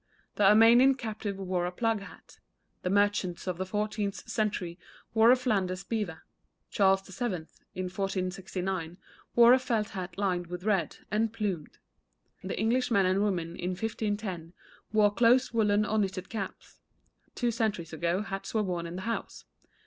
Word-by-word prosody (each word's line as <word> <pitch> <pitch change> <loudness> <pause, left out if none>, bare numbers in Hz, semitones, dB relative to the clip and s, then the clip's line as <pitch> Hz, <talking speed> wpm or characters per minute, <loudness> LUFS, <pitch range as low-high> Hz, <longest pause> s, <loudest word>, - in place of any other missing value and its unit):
The 205 - +2
Armenian 230 +6 +7
captive 215 -5 -5
wore 180 -2 -1
a - - -3
plug 225 +3 0
hat. 200 - -14 0.4
The 180 - -2
merchants 200 -3 +1
of 180 -2 -3
the 185 - -2
fourteenth 210 0 -2
century 200 -6 -2 0.3
wore 220 +1 +6
a 250 - +8
Flanders 195 -7 -1
beaver. 205 -9 -3 0.5
Charles 195 -1 +3
VII., 190 -4 -3 0.3
in 185 - -2
1469, 185 -2 -3 0.4
wore 240 +1 +8
a 260 - +5
felt 225 -4 -1
hat 185 -2 -6
lined 180 -3 0
with 180 +1 -6
red, 195 -7 0
and 215 +1 +1
plumed. 200 -8 -4 0.7
The - - -4
English 235 +4 +1
men 200 -5 +3
and 190 +2 +2
women 175 -5 -1
in 180 +1 -3
1510 205 -5 -3 0.4
wore 210 -1 +4
close 240 +3 +4
woollen 210 -2 +3
or 220 0 0
knitted 190 -2 -2
caps; 200 -4 -6 0.6
two 240 -2 0
centuries 210 -8 -2
ago 170 +5 0
hats 195 +2 -6
were 215 - +3
worn 175 -3 -3
in 170 - -7
the 185 - -5
house. 230 +2 -4
200 Hz, 155 wpm, -29 LUFS, 185-220 Hz, 0.7 s, a